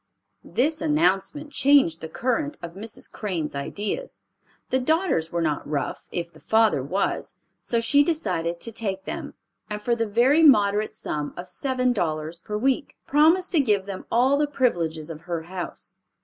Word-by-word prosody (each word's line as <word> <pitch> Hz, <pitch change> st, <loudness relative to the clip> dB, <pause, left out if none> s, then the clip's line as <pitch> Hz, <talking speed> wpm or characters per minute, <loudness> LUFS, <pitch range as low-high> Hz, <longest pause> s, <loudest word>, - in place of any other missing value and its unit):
This 305 Hz, +5 st, 0 dB
announcement 295 Hz, -, +1 dB
changed 275 Hz, -, +4 dB
the 160 Hz, -, -6 dB
current 260 Hz, -, -1 dB
of 170 Hz, -1 st, -6 dB
Mrs. 210 Hz, +4 st, -9 dB
Crane's 175 Hz, -8 st, -3 dB
ideas. 205 Hz, -, -4 dB, 0.5 s
The 260 Hz, -, +3 dB
daughters 315 Hz, -, +1 dB
were 170 Hz, -1 st, 0 dB
not 150 Hz, -2 st, -1 dB
rough, 145 Hz, -2 st, -3 dB
if 170 Hz, 0 st, -4 dB
the 155 Hz, -, -16 dB
father 220 Hz, -9 st, +3 dB
was, 185 Hz, +10 st, -2 dB, 0.3 s
so 235 Hz, -, 0 dB
she 285 Hz, +5 st, +4 dB
decided 180 Hz, -, -1 dB
to 230 Hz, -, -3 dB
take 195 Hz, -4 st, -3 dB
them, -, -, -6 dB, 0.3 s
and 210 Hz, 0 st, -3 dB
for 235 Hz, +3 st, 0 dB
the 230 Hz, -1 st, -1 dB
very 245 Hz, +9 st, +4 dB
moderate 210 Hz, -8 st, +4 dB
sum 150 Hz, -1 st, -4 dB
of 175 Hz, -, -6 dB
seven 255 Hz, +6 st, 0 dB
dollars 160 Hz, -4 st, -2 dB
per 210 Hz, +4 st, -4 dB
week, 265 Hz, +5 st, 0 dB
promised 325 Hz, +6 st, +4 dB
to 335 Hz, -, +3 dB
give 210 Hz, -8 st, +2 dB
them 195 Hz, -2 st, -7 dB
all 260 Hz, +4 st, +4 dB
the 295 Hz, 0 st, +2 dB
privileges 170 Hz, -, 0 dB
of 155 Hz, -1 st, -9 dB
her 170 Hz, -2 st, -4 dB
house. 175 Hz, 0 st, -6 dB
210 Hz, 165 wpm, -25 LUFS, 170-275 Hz, 0.5 s, changed